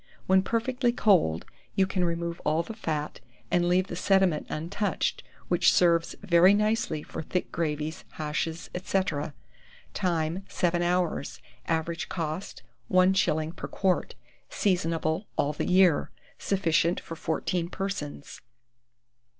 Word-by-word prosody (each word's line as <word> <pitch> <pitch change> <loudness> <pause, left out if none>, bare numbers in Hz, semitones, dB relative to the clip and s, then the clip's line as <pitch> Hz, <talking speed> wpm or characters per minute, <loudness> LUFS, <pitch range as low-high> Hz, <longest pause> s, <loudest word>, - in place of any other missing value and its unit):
When 190 0 +5
perfectly 240 +4 0
cold, 180 - +3 0.3
you 190 - +4
can 185 -1 -1
remove 170 0 -2
all 155 +2 +1
the 225 - -7
fat, 155 -8 -3 0.3
and 175 0 +3
leave 180 +1 +3
the 180 - -6
sediment 190 -3 +2
untouched, 185 +7 -2 0.3
which - - +4
serves 170 -2 +3
very 185 +1 +6
nicely 210 -7 0
for - - -6
thick 180 +3 -3
gravies, 155 -1 -2
hashes, 160 +2 -3 0.2
&c. 195 - +1 0.9
Time. 170 0 -1
7 175 -1 0
hours. 175 -4 0 0.3
Average 165 +1 -1
cost, 165 +1 -4 0.3
1s. 185 -4 +3
per - - -6
quart. 190 -2 0 0.3
Seasonable 165 -1 0
all 145 +1 +1
the - - -3
year. 180 -4 +4 0.3
Sufficient 170 -3 +1
for 165 - -8
14 170 +2 -2
persons. 190 -8 -5
175 Hz, 120 wpm, -27 LUFS, 160-190 Hz, 0.9 s, very